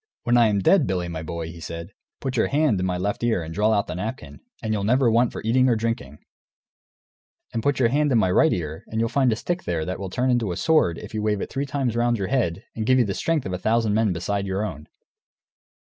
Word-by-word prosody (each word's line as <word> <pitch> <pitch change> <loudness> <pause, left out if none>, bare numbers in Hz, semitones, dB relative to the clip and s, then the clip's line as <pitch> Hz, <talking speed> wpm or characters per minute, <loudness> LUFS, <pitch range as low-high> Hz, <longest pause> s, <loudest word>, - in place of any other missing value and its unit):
"When 120 - +2
I 120 -2 +6
am 105 -1 +1
dead, 165 - +4
Billy, 90 -2 -1
my 80 -2 -5
boy," 80 +1 -5
he 85 - -11
said, 85 +1 -7 0.3
"put 130 -1 -3
your - - +2
hand 145 -8 +2
in 95 - 0
my 90 -1 -1
left 100 +5 -2
ear 115 -7 +1
and 80 +1 -7
draw 105 +5 +2
out 105 -2 +2
the - - -5
napkin, 110 +7 -6 0.2
and 110 -1 -1
you'll 100 -2 -1
never 125 +3 +3
want 120 +1 +3
for - - -7
eating 130 +4 +3
or 120 - +3
drinking; 110 - -3 1.4
and 115 - -1
put 145 +4 +1
your 120 -3 +3
hand 145 +3 +1
in 120 - +4
my 95 -4 +2
right 160 - +4
ear, 80 -2 -3
and 110 - -3
you'll 115 0 +1
find 130 -2 +2
a - - +1
stick 175 +10 -3
there, 80 -3 -1
that 95 0 -4
will 95 -1 -5
turn 125 +7 0
into 115 -6 +1
a 85 - -4
sword 155 - +2
if - - -9
you 110 - -2
wave 105 -1 0
it - - -5
three 140 +1 -2
times 135 -5 -1
round 120 0 +2
your 95 -2 -3
head, 110 -8 0
and 110 -1 -3
give 130 - +5
you 125 - +4
the 100 - -2
strength 160 +6 -1
of 95 - -3
a 90 - -3
thousand 110 +2 +1
men 110 -1 +2
beside 100 +3 -2
your 95 +2 -1
own. 75 -6 -7
110 Hz, 265 wpm, -24 LUFS, 90-125 Hz, 1.4 s, I